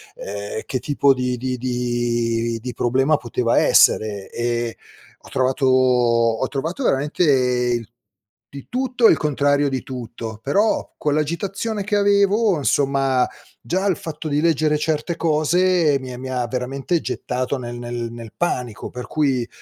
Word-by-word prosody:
ehm, 100 +2 -5
che 130 - -2
tipo 140 +1 +3
di 125 -1 -2
di 125 +1 -3
di 120 -2 -1
di 125 +2 -6
problema 130 +6 +2
poteva 120 -1 0
essere, 100 -3 +3
e 120 -1 -2 0.5
ho - - -14
trovato 130 +1 0
ho 125 -2 +3
trovato 160 - -3
veramente 130 - +1 0.6
di 140 -1 -10
tutto 250 -1 0
e - - +7
il - - +3
contrario 145 -1 +1
di 130 -2 -3
tutto. 115 -3 -7
Però 205 +10 +1
con 150 - 0
l'agitazione 195 +8 -2
che 210 +1 -1
avevo 200 0 +3
insomma, 135 -2 +1 0.3
già 190 +3 -1
il 185 - +1
fatto 160 0 -6
di 145 0 0
leggere 155 -2 +2
certe 160 +2 -1
cose 165 0 +2
mi 130 -1 -8
ha - - -7
mi 130 0 -6
ha 125 -1 -1
veramente 135 +7 -2
gettato 130 +2 -3
nel 120 -1 -6
nel 120 -1 -4
nel 115 -2 -10
panico; 125 -10 -2
per 125 0 -7
cui, 135 -6 0
130 Hz, 145 wpm, -21 LUFS, 120-155 Hz, 0.6 s, e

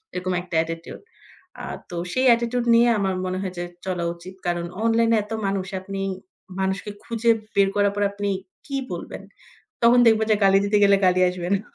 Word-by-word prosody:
এরকম 180 0 -2
একটা 180 -2 -7
অ্যাটিটিউড। 165 0 -4 0.6
আ - - -8 0.3
তো 175 - -7 0.2
সেই 255 +1 +1
অ্যাটিটিউড 235 +1 +2
নিয়ে 235 +1 +5
আমার 190 -1 0
মনে 185 0 -2
হয় 185 -2 -4
যে 175 - -2 0.2
চলা 180 -2 -2
উচিত। 175 +2 -11
কারণ 175 -1 -1 0.2
অনলাইনে 230 0 +3
এত 210 - -16
মানুষ 195 -1 -1
আপনি 195 0 -5 0.6
মানুষকে 190 +2 -2
খুঁজে 230 0 -1 0.3
বের 195 -1 +4
করার 205 -1 +3
পর 205 - 0
আপনি 205 0 -3 0.4
কি 275 - -5 0.2
বলবেন? - - -6 0.6
তখন 235 +1 +6
দেখব 220 -1 +5
যে 215 - +5
গালি 195 0 +6
দিতে 205 +1 +1
গেলে 200 0 +5
গালি 185 0 +3
আসবে 180 -1 -4
না। 195 - 0
195 Hz, 185 wpm, -23 LUFS, 185-225 Hz, 0.6 s, তখন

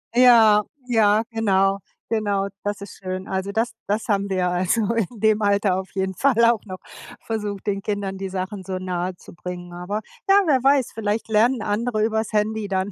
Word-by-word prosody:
Ja, 225 -4 +7 0.2
ja, 220 -2 +3
genau. 195 -3 +2 0.3
Genau, 205 -3 0 0.2
das 205 -1 -3
ist 200 - -10
schön. 185 +1 -4
Also, 190 +1 -2
das 225 +3 -1
das 210 +3 -1
haben 200 -1 0
wir 185 -1 0
also 190 +5 +1
in 230 0 -2
dem 215 0 +3
Alter 200 -2 +2
auf 190 -2 -7
jeden 190 0 -1
Fall 235 0 +3
auch 230 -2 +3
noch 185 -2 -7 0.5
versucht, 210 -3 -4
den 200 -1 -1
Kindern 200 -2 -3
die 195 -1 -4
Sachen 190 +1 -4
so 185 0 -4
nahezubringen. 180 -1 -6
Aber, 190 +5 -4 0.3
ja 390 - +7
wer 270 -5 +3
weiß, 275 -2 +3
vielleicht 215 0 -2
lernen 225 +2 +3
andere 215 +1 -1
über's 220 0 -1
Handy 215 0 0
dann, 190 +1 -1
205 Hz, 175 wpm, -22 LUFS, 190-220 Hz, 0.5 s, Ja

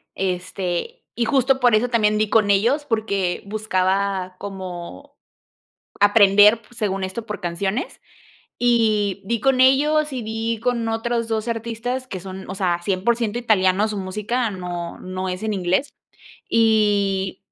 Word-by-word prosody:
este, 185 - -3
y 240 - -1
justo 265 +1 +2
por 245 -3 +4
eso 240 +3 +1
también 215 -3 +2
di 215 0 +1
con 210 -1 +3
ellos, 235 +9 +2
porque 200 -7 -1
buscaba 195 -2 -1
como 180 - -8 0.8
aprender 205 +1 +6
pu 235 +2 -21
según 195 -4 -2
esto, 190 +5 -5
por 210 - -6
canciones, 190 +7 -3 0.6
y 215 -5 +2
di 235 +3 -1
con 265 0 +3
ellos, 300 +3 +3
y 250 -3 -4
di 225 +1 -3
con 240 -1 -1
otros 230 +1 -1
2 220 0 -2
artistas 235 +3 -3
que 190 - -6
son, 190 0 -9
o 190 - -5
sea, 175 -3 0
100% 215 +5 0
italianos, 210 -2 +2
su 210 - -4
música 210 +5 -2
no 175 -3 -6
no 185 0 -4
es 185 +3 -5
en 220 -1 -1
inglés, 190 +7 0 0.5
y 205 -4 +2
210 Hz, 145 wpm, -21 LUFS, 190-235 Hz, 0.8 s, aprender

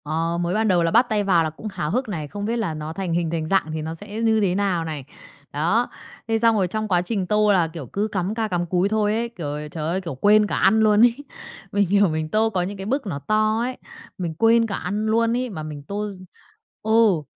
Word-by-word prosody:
Ờ, 165 +2 -1
mới 175 +1 -1
ban 220 +1 +1
đầu 180 -4 +3
là 165 - +1
bắt 235 +6 +5
tay 210 -2 +1
vào 180 -4 +3
là 160 - -1
cũng 160 +8 -9
háo 150 -5 -3
hức 250 +2 -1
này, 160 -7 -4
không 205 +7 -5
biết 230 +2 -1
là 210 -9 -1
nó 155 +1 -6
thành 180 -1 -3
hình 170 -1 0
thành 160 -2 -2
dạng 190 -5 +1
thì 160 - -3
nó 160 +1 -4
sẽ 205 +5 -7
như 220 -1 +3
thế 185 -3 +1
nào 190 -4 0
này. 150 -4 -5 0.5
Đó. 175 +12 +1 0.4
Thế 225 0 +1
xong 230 0 +4
rồi 190 -3 +2
trong 215 +4 -3
quá 180 -4 +2
trình 190 0 -2
tô 210 +1 +3
là, 175 -4 +3
kiểu, 160 -3 -8
cứ 205 - -2
cắm 195 0 -2
ca 225 -1 -1
cắm 175 -3 -1
cúi 180 +3 +1
thôi 210 -1 +1
ấy, 235 +1 -1
kiểu, 150 -8 -5
trời 155 -1 -4
ơi, 185 +3 -1
kiểu, 170 -6 -6
quên 210 +1 +5
cả - - -2
ăn 220 +3 +4
luôn 215 -1 +4
ấy. 235 0 +5 0.6
Mình 200 -1 +2
hiểu 200 +2 +4
mình 155 0 -2
tô 220 +4 +2
có 190 -4 -1
những 195 +3 -4
cái 190 - -6
bức 265 +4 -1
nó 150 -7 -3
to 215 +5 +1
ấy, 250 +2 -2 0.4
mình 170 -3 -3
quên 230 +6 +3
cả 200 - -3
ăn 205 +4 -3
luôn 230 +1 +2
ấy 255 0 -2
mà 160 -7 -6
mình 150 -2 -7
tô 205 +6 -4
d 185 -2 -12 0.6
Ừ. 220 -6 +4
200 Hz, 265 wpm, -23 LUFS, 165-220 Hz, 0.6 s, bắt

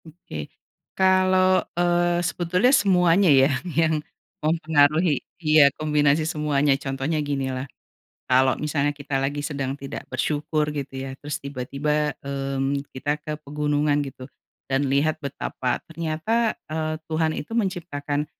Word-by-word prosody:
Oke, 155 - -8 0.5
kalau, 185 0 +4 0.2
eee, 175 0 +2
sebetulnya 180 +9 +2
semuanya 185 - +4
ya, 135 0 +6 0.2
yang 160 -2 +1 0.4
mempengaruhi 155 -1 +3 0.2
iya, 155 -3 +5
kombinasi 150 0 +2
semuanya 150 -2 +1
contohnya 135 +3 -2
gini 140 -2 -2
lah, 130 +1 -5 0.6
kalau 130 +1 +3
misalnya 145 -1 0
kita 145 -2 -3
lagi 140 +2 -1
sedang 140 -2 -3
tidak 140 -1 -6
bersyukur 150 +3 0
gitu 140 -2 -5
ya, 135 0 -5
terus 145 0 -3
tiba-tiba, 140 +2 -1
mmm, 135 0 -1
kita 145 +3 -1
ke 155 - -4
pegunungan 150 0 0
gitu, 130 -2 -8 0.4
dan 135 +1 +1
lihat 150 +3 +2
betapa 130 -2 -3
ternyata, 165 +8 -1
eee, 155 0 -2
Tuhan 160 0 0
itu 150 - -6
menciptakan 160 -9 -2
150 Hz, 125 wpm, -24 LUFS, 140-165 Hz, 0.6 s, ya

